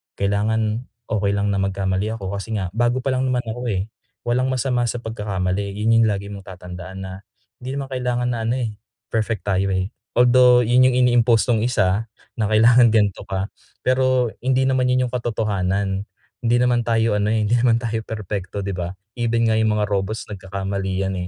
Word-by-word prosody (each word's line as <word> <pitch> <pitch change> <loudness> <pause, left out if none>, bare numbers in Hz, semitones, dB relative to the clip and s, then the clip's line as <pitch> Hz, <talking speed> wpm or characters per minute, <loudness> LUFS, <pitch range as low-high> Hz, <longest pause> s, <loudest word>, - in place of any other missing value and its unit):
kailangan 110 +3 0 0.2
okey 100 -2 +1
lang 100 0 0
na 100 - 0
magkamali 95 +1 -1
ako 95 -3 -5
kasi 105 +3 -4
nga 95 -3 -2
bago 120 +3 +1
palang 130 -1 0
naman 125 -1 0
ako, 120 +2 -4
eh. 95 -1 -1 0.4
Walang 125 +2 +1
masama 125 -1 0
sa 120 +1 -3
pagkakamali, 100 -2 -2
yun 115 +2 +3
yung 115 - +4
lagi 100 0 -2
mong 100 -1 -9
tatandaan 90 +1 -8
na 95 - -6 0.5
hindi 130 +2 -5
naman 140 -1 -3
kailangan 125 -1 -1
na 115 -2 -2
ano, 120 - +1
eh, 110 -3 -4 0.3
perfect 110 -2 -1
tayo, 95 0 +1
eh. 95 +1 -1 0.3
Although 125 0 +6
yun 125 +2 +5
yung 125 - 0
ini-impost 120 -1 +3
nung 110 -2 +3
1 110 -2 +1 0.3
na 110 - +2
kailangan 115 +2 +6
ganito 105 -3 +2
ka 95 +1 -2 0.4
pero 130 -2 +2
hindi 130 0 +2
naman 130 -1 +2
yun 125 0 +2
yung - - -19
katotohanan. 100 -4 -1 0.4
Hindi 120 - +3
naman 120 -1 +2
tayo 115 -2 +2
ano, 105 - +1
eh, 110 - +1
hindi 120 - +3
naman 115 -1 +3
tayo 115 -1 -2
perpekto, 100 -2 -4
di 100 - -3
ba? 90 0 -4 0.2
Even 115 -1 +1
nga 110 - +3
yung 110 -1 +2
mga 105 - +2
robots 100 +2 -2
nagkakamali 95 0 -4
yan, 95 0 -2
110 Hz, 185 wpm, -21 LUFS, 100-120 Hz, 0.5 s, Although